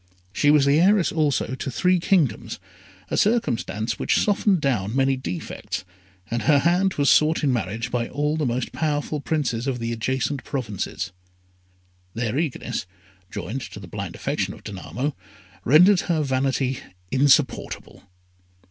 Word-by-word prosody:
She 145 Hz, -, +2 dB
was 145 Hz, -2 st, +5 dB
heiress 175 Hz, +6 st, +4 dB
also 145 Hz, -6 st, 0 dB
to 130 Hz, -, -4 dB
three 180 Hz, +10 st, +2 dB
kingdoms, 165 Hz, -, +1 dB, 0.5 s
a -, -, 0 dB
circumstance 120 Hz, -, 0 dB
which -, -, +1 dB
softened 205 Hz, -2 st, +2 dB
down 120 Hz, -7 st, 0 dB
many 135 Hz, 0 st, +3 dB
defects, 90 Hz, -7 st, -5 dB, 0.5 s
and 120 Hz, 0 st, 0 dB
her 145 Hz, +7 st, +4 dB
hand 175 Hz, +5 st, +2 dB
was 145 Hz, -1 st, +1 dB
sought 155 Hz, +1 st, +4 dB
in 135 Hz, -3 st, +3 dB
marriage 115 Hz, +2 st, -3 dB
by 120 Hz, -1 st, -1 dB
all 150 Hz, +2 st, 0 dB
the 155 Hz, -4 st, 0 dB
most 120 Hz, +1 st, -2 dB
powerful 150 Hz, -1 st, -1 dB
princes 140 Hz, -6 st, -1 dB
of 130 Hz, -2 st, -1 dB
the 115 Hz, -1 st, -3 dB
adjacent 130 Hz, +4 st, -2 dB
provinces. 110 Hz, -8 st, -4 dB, 1.0 s
Their 115 Hz, +3 st, -1 dB
eagerness, 150 Hz, -, -3 dB, 0.4 s
joined 105 Hz, +6 st, -5 dB
to -, -, -9 dB
the -, -, -10 dB
blind -, -, -6 dB
affection -, -, -2 dB
of -, -, -16 dB
Danamo, 105 Hz, -, -4 dB, 0.5 s
rendered 180 Hz, -, +6 dB
her 165 Hz, -4 st, 0 dB
vanity 130 Hz, -1 st, 0 dB, 0.3 s
insupportable. 135 Hz, +1 st, +1 dB
135 Hz, 140 wpm, -23 LUFS, 120-155 Hz, 1.0 s, rendered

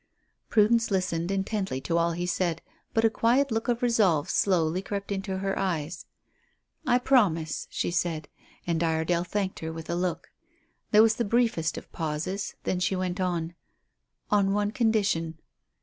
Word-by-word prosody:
Prudence 225 Hz, +1 st, +4 dB
listened 180 Hz, -3 st, 0 dB
intently 195 Hz, -6 st, -1 dB
to 165 Hz, -, -2 dB
all 170 Hz, 0 st, +2 dB
he 175 Hz, +1 st, -2 dB
said, 175 Hz, -2 st, -1 dB, 0.3 s
but 225 Hz, 0 st, +2 dB
a -, -, +6 dB
quiet 250 Hz, +5 st, +2 dB
look 225 Hz, +2 st, -1 dB
of 240 Hz, 0 st, 0 dB
resolve 200 Hz, -11 st, +3 dB
slowly 180 Hz, -2 st, +2 dB
crept 200 Hz, +1 st, -5 dB
into 195 Hz, -1 st, -2 dB
her 195 Hz, 0 st, -1 dB
eyes. 165 Hz, -3 st, -2 dB, 0.8 s
"I 245 Hz, -1 st, +5 dB
promise," 190 Hz, -, +2 dB
she -, -, -2 dB
said, 165 Hz, -3 st, -1 dB, 0.4 s
and 170 Hz, -1 st, 0 dB
Iredale 165 Hz, +1 st, +1 dB
thanked 190 Hz, +1 st, -2 dB
her 160 Hz, 0 st, -4 dB
with 160 Hz, 0 st, -6 dB
a -, -, 0 dB
look. 180 Hz, 0 st, -2 dB, 0.6 s
There 215 Hz, +1 st, +7 dB
was 225 Hz, 0 st, +3 dB
the 235 Hz, -, +1 dB
briefest 220 Hz, -8 st, +1 dB
of -, -, -9 dB
pauses; 165 Hz, +5 st, -3 dB
then 180 Hz, -, -1 dB
she 185 Hz, +1 st, +1 dB
went 185 Hz, 0 st, -2 dB
on 170 Hz, -2 st, -1 dB, 0.8 s
"On 200 Hz, -2 st, +3 dB
one 205 Hz, 0 st, +1 dB
condition." 200 Hz, -9 st, +1 dB
185 Hz, 160 wpm, -27 LUFS, 165-210 Hz, 0.8 s, There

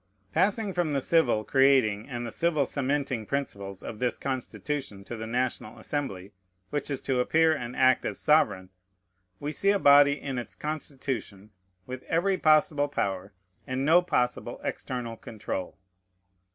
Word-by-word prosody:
Passing 200 Hz, +4 st, +1 dB
from 175 Hz, -4 st, 0 dB
the 140 Hz, -, +2 dB
civil 130 Hz, -7 st, +2 dB
creating 130 Hz, -5 st, +3 dB
and 120 Hz, -2 st, -4 dB
the 115 Hz, -, -5 dB
civil 160 Hz, -4 st, +1 dB
cementing 135 Hz, -5 st, -2 dB
principles 100 Hz, -9 st, -4 dB
of 110 Hz, -, -7 dB
this 125 Hz, -1 st, 0 dB
Constitution 135 Hz, -4 st, -4 dB
to 120 Hz, -, -7 dB
the 110 Hz, 0 st, -6 dB
National 125 Hz, 0 st, -2 dB
Assembly, 105 Hz, -6 st, -4 dB, 0.4 s
which 145 Hz, 0 st, -2 dB
is 140 Hz, -2 st, -3 dB
to 130 Hz, -2 st, 0 dB
appear 160 Hz, +5 st, +3 dB
and 125 Hz, -3 st, -6 dB
act 130 Hz, -1 st, +4 dB
as -, -, -3 dB
sovereign, 105 Hz, -12 st, +2 dB, 0.7 s
we 145 Hz, +1 st, -3 dB
see 195 Hz, +5 st, +1 dB
a 200 Hz, -, +4 dB
body 145 Hz, -3 st, +6 dB
in 135 Hz, -3 st, -4 dB
its 120 Hz, -, -8 dB
constitution 135 Hz, -9 st, -5 dB, 0.3 s
with 130 Hz, 0 st, -7 dB
every 185 Hz, +3 st, +1 dB
possible 155 Hz, -1 st, +4 dB
power 95 Hz, -7 st, -2 dB, 0.4 s
and 130 Hz, +1 st, -2 dB
no 165 Hz, +4 st, +6 dB
possible 125 Hz, -8 st, -1 dB
external 120 Hz, -3 st, -4 dB
control. 100 Hz, -5 st, -6 dB
135 Hz, 150 wpm, -27 LUFS, 115-150 Hz, 0.7 s, body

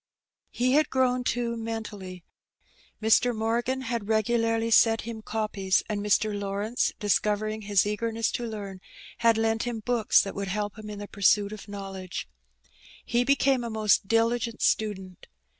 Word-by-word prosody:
He 250 Hz, +1 st, 0 dB
had 300 Hz, +2 st, +3 dB
grown, 255 Hz, -1 st, +1 dB
too, 240 Hz, -1 st, -1 dB
mentally. 210 Hz, -5 st, -6 dB, 0.8 s
Mr. 225 Hz, +2 st, +3 dB
Morgan 235 Hz, +4 st, -1 dB
had 235 Hz, -4 st, -3 dB
regu 220 Hz, +2 st, +1 dB
larly 225 Hz, 0 st, +1 dB
set 225 Hz, 0 st, +5 dB
him 230 Hz, -1 st, -7 dB
copies, 210 Hz, -4 st, 0 dB
and 210 Hz, -1 st, -2 dB
Mr. 210 Hz, +1 st, +2 dB
Lawrence, 205 Hz, +3 st, -1 dB
discovering 210 Hz, +1 st, 0 dB
his 205 Hz, -2 st, +2 dB
eagerness 225 Hz, +2 st, -1 dB
to 240 Hz, -, -3 dB
learn, 200 Hz, -4 st, -7 dB, 0.4 s
had 230 Hz, -1 st, +4 dB
lent 225 Hz, 0 st, +1 dB
him 240 Hz, -2 st, -3 dB
books 235 Hz, -1 st, +3 dB
that 195 Hz, -, -5 dB
would 200 Hz, 0 st, -4 dB
help 205 Hz, +1 st, -3 dB
him 215 Hz, 0 st, -8 dB
in 210 Hz, -, -6 dB
the 205 Hz, 0 st, -7 dB
pursuit 200 Hz, +1 st, +2 dB
of 215 Hz, -1 st, -10 dB
knowledge. 195 Hz, -, -6 dB, 0.8 s
He 240 Hz, +1 st, +1 dB
became 270 Hz, -1 st, +2 dB
a 235 Hz, -, -4 dB
most 215 Hz, -3 st, +2 dB
diligent 230 Hz, +1 st, +1 dB
student. 190 Hz, -4 st, -1 dB
220 Hz, 155 wpm, -27 LUFS, 205-235 Hz, 0.8 s, set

